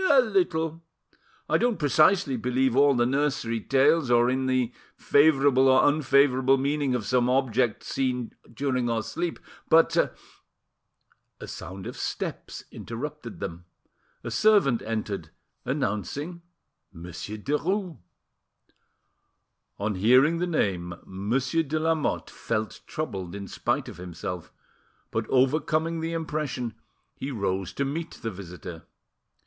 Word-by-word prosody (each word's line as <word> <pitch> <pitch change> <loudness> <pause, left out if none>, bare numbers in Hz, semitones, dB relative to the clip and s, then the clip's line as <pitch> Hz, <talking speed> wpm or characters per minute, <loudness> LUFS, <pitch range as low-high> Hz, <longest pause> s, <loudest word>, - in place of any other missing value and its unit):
"A 280 - +7
little. 170 -8 +1 0.7
I - - +2
don't 240 -3 +1
precisely 155 +1 +3
believe 125 +1 +1
all 140 0 +5
the 120 0 +3
nursery, 135 -3 0
tales, 140 +4 +3
or 120 0 +4
in 130 0 0
the 130 -2 +1 0.2
favourable 140 -3 +4
or 130 0 +5
unfavourable 135 -2 +4
meaning 140 -1 0
of 115 -4 -2
some 125 +3 +2
object 125 -3 +1
seen 125 -3 -2 0.2
during 130 -3 -1
our 115 -1 0
sleep, 165 +10 -3 0.3
but—" 165 +1 +4 1.2
A - - -8
sound 95 0 -8
of - - -6
steps - - -5
interrupted 120 +2 -7
them, 85 +1 -6 0.6
a - - -5
servant 200 - +4
entered, 105 -7 -4 0.4
announcing 140 - -2 0.5
Monsieur 90 +5 -7
Derues. 165 - -1 1.8
On 105 +1 -1
hearing 130 - +4
the 180 - 0
name, 90 - -1
Monsieur 125 - 0
de 155 0 -2
Lamotte 160 -1 0
felt 110 -1 -3
troubled 95 - -4
in 100 -1 -6
spite - - -1
of - - -9
himself, 90 0 -6 0.6
but, - - -2
overcoming 155 +5 +2
the 165 +1 -3
impression, 150 -7 -3 0.4
he 135 - -5
rose 95 -6 -2
to 140 - -1
meet 160 +4 -4
the 115 - -2
visitor. 90 -3 -9
130 Hz, 120 wpm, -26 LUFS, 110-155 Hz, 1.8 s, A